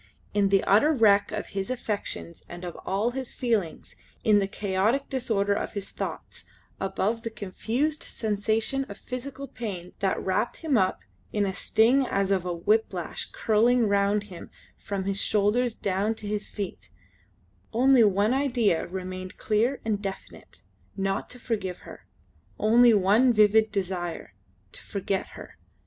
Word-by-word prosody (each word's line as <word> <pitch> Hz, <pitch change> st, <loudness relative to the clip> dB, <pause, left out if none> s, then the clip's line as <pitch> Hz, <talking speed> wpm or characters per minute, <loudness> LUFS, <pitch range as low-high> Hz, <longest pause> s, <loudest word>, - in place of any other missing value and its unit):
In 200 Hz, -1 st, +3 dB
the 195 Hz, -1 st, +3 dB
utter 220 Hz, +10 st, +4 dB
wreck 210 Hz, -7 st, +4 dB
of 210 Hz, -, -4 dB
his 195 Hz, -1 st, -3 dB
affections 210 Hz, -8 st, -4 dB
and 175 Hz, +1 st, -8 dB
of 175 Hz, -, -6 dB
all 205 Hz, +5 st, +1 dB
his 260 Hz, 0 st, -5 dB
feelings, 220 Hz, -10 st, -2 dB, 0.3 s
in 210 Hz, -2 st, +5 dB
the 195 Hz, -, 0 dB
chaotic 205 Hz, +7 st, 0 dB
disorder 220 Hz, -6 st, +1 dB
of -, -, -3 dB
his 200 Hz, -2 st, -5 dB
thoughts, -, -, -6 dB, 0.4 s
above 195 Hz, +4 st, -1 dB
the 230 Hz, -, -4 dB
confused 230 Hz, +9 st, -2 dB
sensation 220 Hz, +4 st, -1 dB
of 200 Hz, -5 st, -10 dB
physical 265 Hz, +2 st, -6 dB
pain 185 Hz, -9 st, -6 dB
that 195 Hz, -1 st, 0 dB
wrapped 205 Hz, +5 st, -1 dB
him 295 Hz, -4 st, +2 dB
up 190 Hz, -4 st, +1 dB, 0.3 s
in 205 Hz, -, +1 dB
a 190 Hz, -, -2 dB
sting 235 Hz, +8 st, +3 dB
as 195 Hz, 0 st, 0 dB
of 185 Hz, -2 st, +1 dB
a 180 Hz, -, -1 dB
whiplash 185 Hz, 0 st, -1 dB
curling 230 Hz, +2 st, +3 dB
round 200 Hz, +1 st, +2 dB
him 185 Hz, -5 st, -11 dB, 0.3 s
from 200 Hz, -2 st, -4 dB
his 195 Hz, +1 st, -2 dB
shoulders 220 Hz, +3 st, +1 dB
down 200 Hz, +3 st, -1 dB
to 210 Hz, -, -7 dB
his 210 Hz, 0 st, -2 dB
feet, 200 Hz, -3 st, -6 dB, 0.8 s
only 255 Hz, +1 st, +5 dB
one 205 Hz, +2 st, +3 dB
idea 245 Hz, -10 st, +1 dB
remained 185 Hz, 0 st, -6 dB
clear 230 Hz, +5 st, 0 dB
and 210 Hz, -2 st, 0 dB
definite 195 Hz, -1 st, -8 dB, 0.3 s
not 195 Hz, 0 st, -1 dB
to 250 Hz, -, -9 dB
forgive 210 Hz, -7 st, -3 dB
her; -, -, -13 dB, 0.5 s
only 235 Hz, +3 st, +6 dB
one 215 Hz, +5 st, +4 dB
vivid 215 Hz, 0 st, +4 dB
desire 180 Hz, -, -3 dB, 0.4 s
to -, -, -9 dB
forget 195 Hz, -1 st, -3 dB
her. -, -, -12 dB
210 Hz, 150 wpm, -26 LUFS, 195-230 Hz, 0.8 s, only